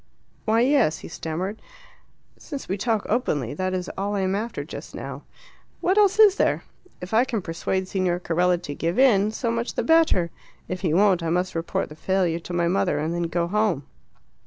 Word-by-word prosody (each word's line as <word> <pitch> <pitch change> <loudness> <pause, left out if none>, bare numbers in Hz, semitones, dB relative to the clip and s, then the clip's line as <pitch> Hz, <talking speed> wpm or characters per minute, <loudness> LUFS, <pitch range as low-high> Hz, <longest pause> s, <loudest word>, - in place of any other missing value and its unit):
"Why, 225 +1 +3
yes," 245 - +3
he - - -6
stammered. 180 +7 -4 0.7
"Since 285 -3 -8
we 190 - -1
talk 215 +1 -1
openly, 150 - 0
that 185 +4 -2
is 180 -1 -3
all 200 +2 -2
I 200 - 0
am 190 0 0
after 220 +4 -3
just - - -9
now. - - -6 0.6
What 370 - +2
else 405 -1 +4
is 415 -2 +7
there? - - +1 0.4
If 180 +4 -7
I 225 +3 +5
can 245 -4 -2
persuade 185 +3 -2
Signor 185 -2 0
Carella 180 +1 +2
to 145 - -5
give 165 +4 -2
in, 215 -6 +5
so 230 +2 -2
much 230 +1 -2
the - - 0
better. 320 - +3 0.4
If 185 0 -4
he 175 -5 0
won't, 185 +1 +4
I 165 - -2
must 180 +2 0
report 165 0 -2
the 150 - -10
failure 180 -1 0
to 170 - -9
my 175 -1 +1
mother 185 +3 +1
and 155 +3 -1
then 175 0 -1
go 170 0 0
home. 200 -7 0
185 Hz, 200 wpm, -24 LUFS, 170-220 Hz, 0.7 s, is